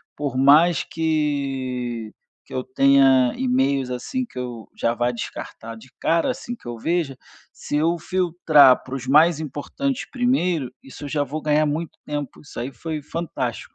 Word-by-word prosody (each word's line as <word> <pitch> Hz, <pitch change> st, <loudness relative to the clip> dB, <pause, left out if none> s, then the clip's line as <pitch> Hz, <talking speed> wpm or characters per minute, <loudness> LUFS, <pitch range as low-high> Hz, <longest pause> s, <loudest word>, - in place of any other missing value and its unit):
por 140 Hz, -3 st, -3 dB
mais 155 Hz, +6 st, +5 dB
que 135 Hz, -7 st, -2 dB, 0.3 s
que -, -, -13 dB
eu 130 Hz, -, -1 dB
tenha 130 Hz, -1 st, +4 dB
e-mails 130 Hz, +1 st, +1 dB
assim, 250 Hz, -, -3 dB
que -, -, -14 dB
eu 120 Hz, -3 st, -6 dB
já 115 Hz, -, 0 dB
vá 120 Hz, +1 st, 0 dB
descartar 115 Hz, -1 st, -7 dB
de 130 Hz, -, -15 dB
cara, 165 Hz, +8 st, +1 dB
assim 245 Hz, -1 st, -6 dB
que -, -, -15 dB
eu 120 Hz, -1 st, -5 dB
veja, 160 Hz, 0 st, -1 dB, 0.4 s
se 145 Hz, -, -3 dB
eu 165 Hz, +3 st, +2 dB
filtrar 165 Hz, -6 st, +4 dB
pra 130 Hz, -, -9 dB
os 130 Hz, -1 st, -6 dB
mais 155 Hz, +3 st, +5 dB
importantes 200 Hz, -, -3 dB
primeiro, 180 Hz, -, +1 dB
isso 135 Hz, +2 st, -10 dB
eu -, -, -4 dB
já 145 Hz, 0 st, 0 dB
vou 145 Hz, +3 st, -5 dB
ganhar 150 Hz, 0 st, +2 dB
muito 155 Hz, +3 st, -3 dB
tempo, 145 Hz, -2 st, -5 dB
isso 145 Hz, -, -9 dB
aí 120 Hz, -, -3 dB
foi 155 Hz, +5 st, -5 dB
fantástico. 145 Hz, -6 st, -4 dB
145 Hz, 165 wpm, -22 LUFS, 130-160 Hz, 0.4 s, mais